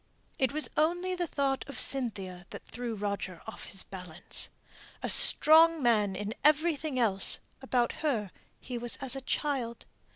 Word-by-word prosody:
It 260 -3 +2
was 305 +1 +2
only 350 +4 +1
the 355 -1 -2
thought 275 -3 -1
of 280 - -5
Cynthia 195 -9 -2
that - - -10
threw 240 -1 -5
Roger 200 -4 -4
off 220 - -8
his 195 - -3
balance. 180 -4 -4 0.5
A - - -1
strong 320 0 +6
man 210 -5 +2
in 205 +3 -4
everything 305 -2 +2
else, 200 -6 +3 0.2
about 250 -3 0
her 230 - -1 0.3
he 245 -2 -6
was 240 0 -2
as 270 -1 +1
a 270 - -5
child. 260 -4 -3
245 Hz, 155 wpm, -29 LUFS, 205-300 Hz, 0.5 s, strong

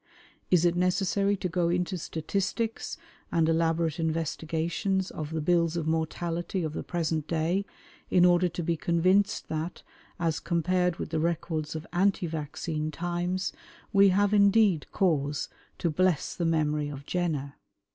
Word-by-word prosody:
Is 175 -2 +4
it 175 0 +3
necessary 195 +3 +1
to 185 - -2
go 175 -1 0
into 180 +2 0
statistics 195 +7 -2 0.3
and 165 -2 +3
elaborate 165 0 +1
investigations 165 +4 -1
of 155 -1 -5
the 160 0 -2
bills 170 +1 +2
of 165 - -2
mortality 165 +3 -1
of 155 -1 -3
the - - -3
present 160 -3 -2
day 170 +4 0 0.4
in 180 -1 +5
order 175 0 +4
to 170 +1 -4
be 170 +1 +1
convinced 185 +6 +2
that, 160 +2 -4 0.4
as 165 -2 0
compared 180 +1 +1
with 155 - -6
the 160 - 0
records 160 -1 -2
of 155 0 -5
anti 190 +1 +2
vaccine 155 0 -3
times, 175 +3 -2 0.4
we 200 0 +7
have 205 +2 +2
indeed 200 -4 +4
cause 150 -7 0 0.3
to 170 - 0
bless 180 -1 +1
the 170 - -2
memory 150 -2 +1
of 140 -1 -8
Jenner? 155 -6 -2
170 Hz, 145 wpm, -28 LUFS, 160-180 Hz, 0.4 s, we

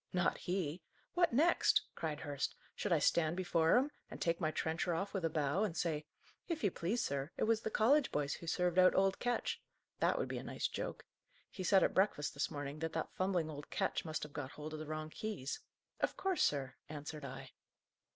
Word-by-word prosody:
"Not 180 -1 +2
he. 175 -2 -2 0.3
What 350 -1 +4
next?" 315 +8 +4
cried 155 -3 -3
Hurst. 145 -3 -2 0.2
"Should - - -3
I - - +6
stand 170 0 +3
before 170 0 +4
him, 275 +4 +2 0.2
and - - -8
take 165 +1 +1
my 155 - +2
trencher 160 +2 0
off, 195 +5 -2
with 195 -3 -1
a 165 - +2
bow, 150 +3 +1
and 180 -6 -1
say, 155 -3 0 0.4
'If 335 -3 -2
you 200 - +3
please, 195 +10 0
sir, 140 +1 -2
it - - +1
was 225 0 +3
the - - -2
college 265 +7 +4
boys 145 -1 0
who 170 - -8
served 180 +1 +2
out 185 0 +7
old 195 0 +3
Ketch!' 245 0 -1 0.4
That - - +3
would - - 0
be - - -3
a - - -7
nice - - -1
joke! - - -5 0.5
He 190 - -5
said, 190 +1 +5
at - - +2
breakfast, 190 -7 +2
this 140 - -1
morning, 145 -1 -5
that 160 0 -2
that 160 - -2
fumbling 180 -4 0
old 145 -1 -8
Ketch 195 - 0
must 155 -2 -3
have 150 -1 -7
got 145 -3 -4
hold 155 +1 -7
of 155 - -4
the 155 - -6
wrong 155 0 -4
keys. 200 -11 -4 0.4
'Of - - 0
course, 380 -3 0
sir!' 135 -2 +2 0.2
answered 150 0 -6
I." 135 -1 -7
165 Hz, 215 wpm, -36 LUFS, 150-195 Hz, 0.5 s, out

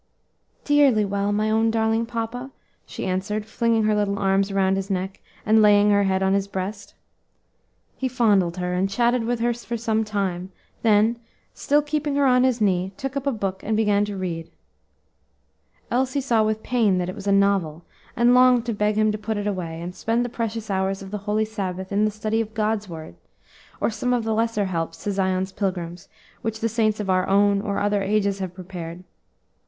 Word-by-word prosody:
"Dearly 280 -8 +4
well, 200 +1 -1
my 215 +1 +1
own 225 +1 +3
darling 225 0 +1
papa," 235 +2 -4 0.4
she - - -6
answered, 195 +3 -2
flinging 225 0 +1
her 215 0 +2
little 205 -1 0
arms 195 0 +1
around 195 -1 +2
his 195 +1 -3
neck, 190 +1 -3 0.3
and 220 0 +5
laying 205 0 +5
her 200 0 +3
head 190 0 +1
on 190 0 +2
his 200 0 +1
breast. 200 +1 -5 1.0
He 265 - -1
fondled 205 -8 +2
her, 180 0 -2
and 185 +2 0
chatted 235 +3 +1
with 240 0 -1
her 240 0 +2
for 235 0 -5
some 220 -1 0
time, 190 -3 -3 0.3
then, 220 +1 +3 0.3
still 295 +1 +1
keeping 295 -1 -2
her 285 0 +3
on 250 -1 +4
his 255 -2 +2
knee, 190 -2 +1
took 270 0 -5
up 280 0 -2
a - - +3
book 195 -5 -3
and 215 0 0
began 205 -2 +3
to 205 -1 -5
read. 170 -3 -4 1.4
Elsie 260 +3 +1
saw 240 -5 +2
with 215 0 -1
pain 225 -7 +2
that 180 -1 -1
it 185 - -4
was 205 0 -8
a - - +3
novel 195 -5 +1 0.3
and 240 +1 +4
longed 250 -1 +5
to 235 - -1
beg 210 0 0
him 215 0 +3
to 210 - -4
put 215 0 -3
it 205 - -3
away, 175 -5 -3
and 175 +1 -6
spend 230 +5 0
the - - -3
precious 225 -2 -4
hours 195 0 -1
of 190 - -10
the 210 - -3
holy 215 +1 +2
Sabbath 190 -3 -5
in 205 +2 +2
the - - +2
study 215 +1 -1
of 220 -1 -7
God's 215 -2 -1
word, 160 - -8 0.7
or - - +1
some 250 +3 -1
of 240 -2 0
the 220 0 -1
lesser 225 -2 0
helps 165 -3 -4
to 205 - -1
Zion's 190 -1 0
pilgrims 180 -3 -4 0.3
which 225 -1 -3
the 230 - 0
saints 215 -1 +1
of 210 - -3
our 185 -1 +2
own 200 0 +3
or 200 -1 -2
other 205 0 +1
ages 200 0 0
have 185 -2 -5
prepared. 180 -2 -8
210 Hz, 200 wpm, -23 LUFS, 190-225 Hz, 1.4 s, and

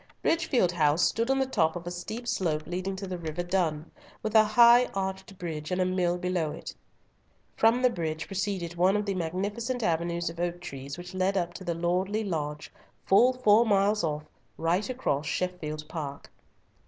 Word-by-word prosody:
Bridgefield 270 - +2
House 155 -1 +2
stood 230 +2 +1
on 270 - +3
the 265 - +2
top 160 -11 +1
of 175 -1 -6
a 175 - -4
steep 215 +7 -6
slope 155 -8 -1
leading 185 +3 -3
to 195 +1 -6
the 185 -2 -5
river 165 +1 -3
Dun, 170 -4 -1 0.3
with 215 - -2
a 220 -1 +8
high 235 +3 +6
arched 190 0 -4
bridge 155 -4 -5
and 180 - -1
a 185 - +3
mill 180 -1 +1
below 180 -3 -1
it. 150 - -7 0.8
From 230 +3 +3
the 250 - +6
bridge 160 -5 -3
proceeded 195 -3 -3
one 180 +3 +3
of 210 - -2
the 200 - -1
magnificent 205 +8 -2
avenues 170 -1 0
of 165 0 -5
oak 175 0 -2
trees 140 -4 -7
which 180 +1 -9
led 185 +1 +1
up 175 -1 -1
to 190 - -9
the 170 -2 -2
lordly 185 +5 0
lodge, 150 -6 -4 0.3
full 240 +6 +6
four 230 -3 +5
miles 205 -1 +2
off, 150 -1 -2 0.3
right 175 +7 0
across 160 - -1
Sheffield 155 -4 -3
Park. 145 -4 -6
180 Hz, 185 wpm, -28 LUFS, 165-205 Hz, 0.8 s, a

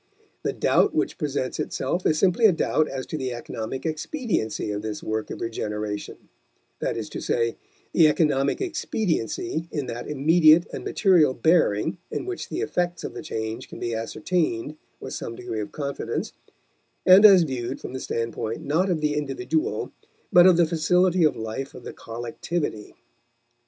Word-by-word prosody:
The - - -1
doubt - - +2
which - - -1
presents 140 -2 -2
itself 175 +3 -1
is 155 - +2
simply 195 +6 +4
a - - +5
doubt 155 -2 +1
as 135 -1 -5
to 155 - -5
the 130 -1 -2
economic 120 +2 -5
expediency 160 - -2
of 105 0 -3
this 105 -1 -5
work 110 0 -2
of - - -7
regeneration 105 -2 -4 0.5
that - - -2
is - - -4
to - - -6
say, 115 -1 0 0.4
the 165 -3 +6
economic 145 -3 +1
expediency 175 - -2
in 145 -3 -2
that 120 0 -6
immediate 155 +3 +5
and - - -5
material 175 -10 +3
bearing 160 - +2
in - - -4
which 375 -1 -5
the 360 - -3
effects 175 - -1
of - - -5
the - - -6
change 110 -3 -5
can - - -9
be 120 - -3
ascertained 130 +3 -1 0.2
with - - -7
some 115 - -5
degree 110 - -5
of 105 - -6
confidence, 140 -2 -4 0.7
and 185 +3 +8
as 195 -4 +9
viewed 130 -3 -4
from - - -8
the 130 - -4
standpoint 115 -2 -3
not 170 +7 +1
of 165 -4 0
the 150 -1 +1
individual 140 -4 -2 0.4
but 175 +1 +8
of 180 -2 +6
the 170 - +5
facility 180 +2 +2
of 155 - +3
life 110 +5 -5
of 125 - -10
the - - -7
collectivity. 120 +2 -5
150 Hz, 165 wpm, -25 LUFS, 115-175 Hz, 0.7 s, as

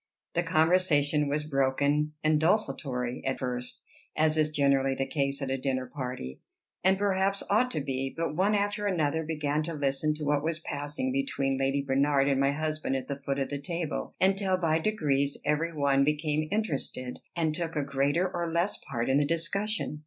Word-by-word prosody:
The 175 - +2
conversation 155 -3 +3
was 150 +2 0
broken 145 +1 +1
and 155 -1 +3
desultory 135 - 0
at 135 - -1
first, 125 -1 -4 0.3
as 155 0 +3
is 155 -1 +3
generally 140 -2 +2
the 135 - -1
case 140 0 -1
at 130 - -2
a 135 - -1
dinner 130 -1 -1
party 125 - -6 0.4
and 190 +1 +4
perhaps 195 0 +1
ought 245 +5 +3
to 155 - -2
be; 135 -1 -2
but 165 -2 -1
one 200 +5 +2
after 205 0 0
another 160 -4 +1
began 150 -1 -1
to 165 +1 -4
listen 145 +1 0
to 155 - -6
what 145 0 +1
was 160 0 0
passing 150 - -3
between 140 - -1
Lady 135 +1 +1
Bernard 140 0 +2
and 135 -1 +2
my 135 0 +3
husband 155 -1 -2
at 130 - -2
the 140 -1 -5
foot 140 0 -2
of 135 -1 -1
the 145 -1 -4
table, 165 +1 -4
until 190 0 +2
by 165 -3 +1
degrees 145 -8 +1
every 150 +3 +1
one 140 -3 +2
became 150 +1 0
interested, 140 - -2 0.2
and 160 -3 +1
took 165 0 -3
a 150 - +1
greater 140 +6 +1
or 170 -2 -3
less 170 +4 0
part 120 -2 -1
in 135 +1 +3
the - - +3
discussion. 185 +2 -1
150 Hz, 185 wpm, -29 LUFS, 140-170 Hz, 0.4 s, and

